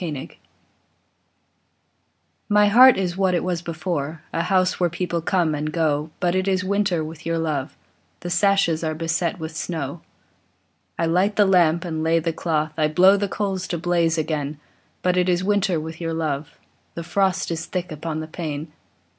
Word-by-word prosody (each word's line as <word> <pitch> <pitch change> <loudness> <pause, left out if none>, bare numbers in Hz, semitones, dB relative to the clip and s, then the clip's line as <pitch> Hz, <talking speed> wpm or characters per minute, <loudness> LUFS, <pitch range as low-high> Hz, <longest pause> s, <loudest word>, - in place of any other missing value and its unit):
ALMS 150 -6 -5 2.2
My 210 0 +5
heart 255 +4 +8
is 180 -2 -2
what 190 -2 +2
it - - 0
was 180 -2 -2
before, 160 -2 -4
A - - 0
house 185 +1 +1
where 175 -1 +2
people 170 0 -2
come 170 -2 +1
and 150 +1 -2
go; 155 -2 0
But 175 -1 +1
it 185 +1 0
is 190 -1 +1
winter 190 -4 0
with 155 +1 -8
your 165 0 -1
love, 155 -3 -2 0.4
The 175 - -5
sashes 195 -4 +2
are 155 -1 -1
beset 165 +2 -1
with 160 0 -6
snow. 160 -2 -4 1.0
I 165 - +1
light 185 +5 +2
the 205 - +5
lamp 170 -3 +3
and 160 -2 -3
lay 165 +1 +2
the 165 0 -1
cloth, 155 -1 -1
I 155 - +3
blow 185 +6 +5
the 200 0 -1
coals 190 -3 -2
to 175 - -2
blaze 170 -1 +1
again; 150 -2 -2 0.5
But 180 0 +2
it 180 0 +2
is 180 0 +1
winter 195 -4 +1
with 160 +2 -7
your 165 -1 -2
love, 155 -2 -3 0.4
The 170 - -5
frost 190 0 0
is 160 0 -4
thick 180 -1 -4
upon 155 +1 -4
the 155 - -6
pane. 155 -2 -5
170 Hz, 180 wpm, -22 LUFS, 160-185 Hz, 2.2 s, heart